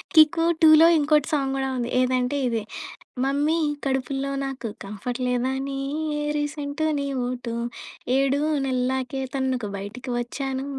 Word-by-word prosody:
'కిక్కు-2లో' 320 0 +6
ఇంకోటి 300 -1 +3
సాంగ్ 275 -3 +1
గూడా 270 0 -1
ఉంది 240 -1 -2
ఏదంటే 255 +1 +1
ఇ‌ది. 230 -2 0 0.6
మమ్మీ 290 +4 +1 0.3
కడుపులో 270 0 -1
నాకు 270 -3 -4 0.2
కంఫర్ట్ 210 +5 -5
లేదని 265 +2 -1 0.6
రీసెంటు 295 +1 -2
నీ 280 - -2 0.2
ఓటు 245 -1 -4 0.6
7 275 +1 +2 0.3
నెల్లకే 260 0 -1
తనకు 260 -4 -1
బయటకి 215 +7 -7
వచ్చానూ 265 +2 -3
270 Hz, 110 wpm, -24 LUFS, 250-285 Hz, 0.6 s, కిక్కు-2లో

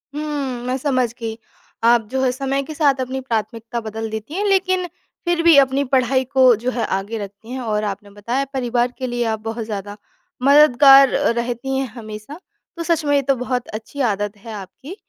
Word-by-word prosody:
हुँ। 285 -5 -3
मैं 250 +1 -1
समझ 255 -4 0
गई। 225 -1 -4 0.5
आप 235 0 +5
जो 265 0 0
है, 255 - +3
समय 275 +2 -2
के 310 - -8
साथ 285 -3 +2
अपनी 260 +1 -3
प्राथमिकता 230 -1 -3
बदल 220 0 -5
देती 220 +6 -6
हैं, 395 +4 -1
लेकिन 375 -2 +2 0.4
फिर 345 -1 +1
भी 335 -2 +7
अपनी 275 0 +4
पढ़ाई 260 0 +2
को 260 -3 +6
जो 255 - 0
है 240 -2 -1
आगे 195 +4 -3
रखती 205 +2 -9
हैं। 260 - -4
और 215 -3 -1
आपने 205 0 -5
बताया, 235 +7 -2
परिवार 245 -1 0
के 255 - -3
लिए 240 0 -1
आप 220 - -4
बहुत 225 0 -4
ज़्यादा 205 -1 -6 0.5
मददगार 275 -1 +7
अ, - - +2
रहती 240 +3 -2
हैं 265 0 -1
हमेशा, 215 +6 -9 0.4
तो 335 - -3
सच 330 -1 +1
में 285 0 +2
ये 280 - +3
तो 275 0 +1
बहुत 250 0 -3
अच्छी 220 +6 -6
आदत 205 +1 -4
है 220 +2 -10
आपकी। 215 - -9
250 Hz, 200 wpm, -20 LUFS, 225-275 Hz, 0.5 s, भी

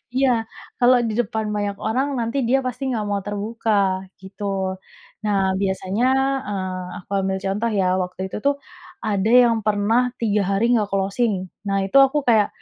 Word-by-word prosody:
Iya, 265 0 +3 0.5
kalau 250 +1 +6
di 215 - -2
depan 220 -1 -1
banyak 205 -1 -2
orang 255 +6 0
nanti 230 +4 -2
dia 270 +2 +3
pasti 255 +2 -4
nggak 220 -4 -1
mau 200 0 0
terbuka, 215 +2 -2 0.5
gitu. 190 +2 -10 0.8
Nah 205 -2 +1 0.2
biasanya, 195 +4 0 0.4
eee, 185 -2 -3 0.2
aku 195 - -13
ambil 190 0 -1
contoh 210 +4 0
ya, 185 - +2 0.2
waktu 180 +1 -7
itu - - -4
tuh, 285 0 +3 0.5
ada 205 0 0
yang 230 -1 +3
pernah 215 +3 +2 0.2
3 210 -2 +2
hari 195 +3 +1
nggak 215 -3 +2
closing. 200 +3 +1 0.3
Nah 195 0 +1
itu 195 - +2
aku 285 +3 -2
kayak, 220 -3 +5
210 Hz, 160 wpm, -22 LUFS, 195-235 Hz, 0.8 s, kalau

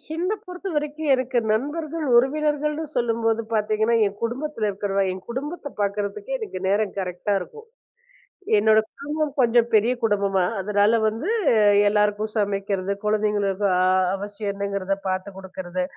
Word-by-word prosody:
என்னைப் 380 +5 -2
பொறுத்தவரைக்கும், 315 -5 -4
எனக்கு 255 -1 0
நண்பர்கள், 305 +7 -2
உறவினர்கள் 300 +4 +2
என்று 320 +1 -4
சொல்லும்போது 230 -1 +1
பார்த்தீங்கன்னா, 215 +1 +1
என் 200 0 -4
குடும்பத்துல 240 -1 -2
இருக்கிற 200 0 -1
என் 185 0 -9
குடும்பத்தைப் 285 +4 -5
பார்க்கறதுக்கே 205 - -2
எனக்கு 430 - -5
நேரம் 205 +1 +1
கரெக்ட்டா 180 +2 -2
இருக்கும். 445 - -10 0.9
என்னோட 215 +1 +5 0.6
கொஞ்சம் 235 -1 +4
பெரிய 220 +3 +4
குடும்பமா. 200 -3 +2 0.2
அதனால 205 +2 +2
வந்து 225 - -3 0.6
எல்லாருக்கும் 210 +1 +1
சமைக்கிறது, 200 -2 -1
குழந்தைகளுக்கு 210 -2 +1 0.5
அவசியம் 205 +1 -4
என்னங்கிறதை 200 -1 -2
பார்த்துக் 185 +1 -3
கொடுக்கிறது, 185 -1 -5
215 Hz, 115 wpm, -23 LUFS, 200-270 Hz, 0.9 s, என்னோட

